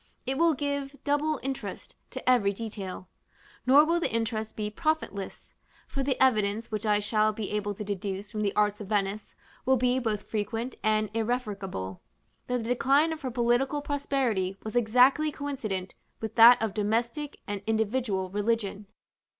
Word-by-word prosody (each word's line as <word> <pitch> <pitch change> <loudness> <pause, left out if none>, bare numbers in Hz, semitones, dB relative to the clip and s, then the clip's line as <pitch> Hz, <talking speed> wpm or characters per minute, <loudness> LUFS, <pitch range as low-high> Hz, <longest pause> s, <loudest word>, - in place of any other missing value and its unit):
It 265 +1 -2
will 335 -2 +4
give 285 0 -3
double 290 +1 +1
interest 270 0 -5
to - - -8
every 225 -6 +4
detail: 195 -4 -6 0.6
nor 285 +4 +7
will 335 +2 +2
the - - -1
interest 225 -1 -2
be 210 -1 -3
profitless; 310 - -3 0.3
for 275 - -3
the 265 -1 0
evidence 220 -3 +2
which 215 0 -2
I 210 -1 +4
shall 215 +1 +2
be 210 -1 -4
able 205 -1 -2
to 210 - -5
deduce 200 0 -4
from 215 -2 -3
the 200 -2 0
arts 210 0 +2
of 205 - -7
Venice 205 0 -1 0.3
will 265 +1 +3
be 250 +1 +2
both 215 -4 -1
frequent 225 +4 -3
and 215 -1 +1
irrefragable, 205 - -3 0.5
that 250 -2 -1
the 225 - -5
decline 275 +6 +3
of 315 - -8
her 260 - -3
political 250 +4 +1
prosperity 260 -10 -1
was 215 +1 -6
exactly 250 +6 +4
coincident 220 -11 -4 0.3
with 220 -2 -4
that 235 +2 +9
of 220 -3 -1
domestic 235 +8 -1
and 205 -1 -4
individual 220 -4 0
religion. 205 -1 -1
225 Hz, 160 wpm, -28 LUFS, 205-265 Hz, 0.6 s, that